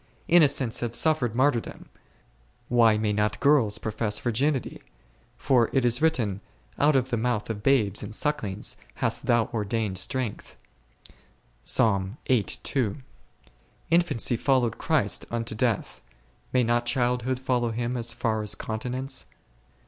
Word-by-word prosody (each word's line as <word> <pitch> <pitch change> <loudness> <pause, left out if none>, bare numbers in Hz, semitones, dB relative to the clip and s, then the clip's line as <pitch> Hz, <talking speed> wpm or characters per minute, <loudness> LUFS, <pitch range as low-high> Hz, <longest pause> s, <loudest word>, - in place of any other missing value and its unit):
Innocents 145 -8 +3
have 120 -1 -3
suffered 125 -4 +1
martyrdom, 130 -2 0 0.8
why 115 -3 +4
may 105 -1 0
not 105 0 0
girls 130 -8 +3
profess 110 -1 -2
virginity? 130 +5 -1 0.6
for 125 -4 +2
it 130 -2 +2
is 120 +2 +3
written, 115 -12 +1 0.4
out 150 0 +4
of 130 -1 +1
the 120 - +1
mouth 115 -1 -1
of 105 -2 -6
bales 110 -6 +2
and 105 - -6
sucklings 110 -10 -1 0.2
hast - - -1
Thou 120 -1 +3
ordained 105 -3 -1
strength 120 +2 -3 1.1
5. 100 0 +1 1.7
Infancy 165 -8 +2
followed 130 -3 +1
Christ - - 0
unto 115 -1 -3
death, 110 -1 -1 0.5
may 125 -1 +3
not 120 +1 0
childhood 125 0 0
follow 125 -2 0
Him 120 +2 -3
as 120 -1 -1
far 110 -1 -1
as 105 - -4
continence 125 +4 -5
120 Hz, 125 wpm, -26 LUFS, 110-130 Hz, 1.7 s, why